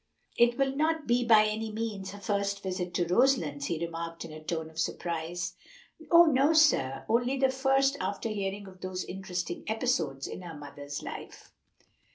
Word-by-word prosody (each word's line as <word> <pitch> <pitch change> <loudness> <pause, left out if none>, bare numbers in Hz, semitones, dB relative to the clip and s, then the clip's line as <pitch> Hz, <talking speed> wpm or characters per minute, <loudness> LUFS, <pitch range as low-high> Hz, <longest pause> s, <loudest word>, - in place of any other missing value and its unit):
"It 240 0 +4
will 270 -1 +1
not 315 +1 +1
be 245 0 +2
by 220 -2 +6
any 215 +1 -2
means 210 -3 -4
her 205 - -9
first 200 0 -1
visit 185 -2 -3
to 175 - +2
Roselands," 170 - +2
he 170 - -1
remarked 165 0 -6
in 165 - -9
a 155 0 -10
tone 160 0 -3
of 160 - -9
surprise. 170 +1 -2 0.6
"Oh, 345 0 +8
no, 290 0 +4
sir! 135 - +3
only 245 +4 +2
the 265 0 +3
first 270 +1 +2
after 205 +3 -2
hearing 200 -1 -3
of 185 -1 -14
those 185 -1 -4
interesting 180 -2 -4
episodes 180 - 0
in - - -6
her 170 -4 -8
mother's 145 0 -7
life." - - -9
200 Hz, 175 wpm, -29 LUFS, 170-245 Hz, 0.6 s, Oh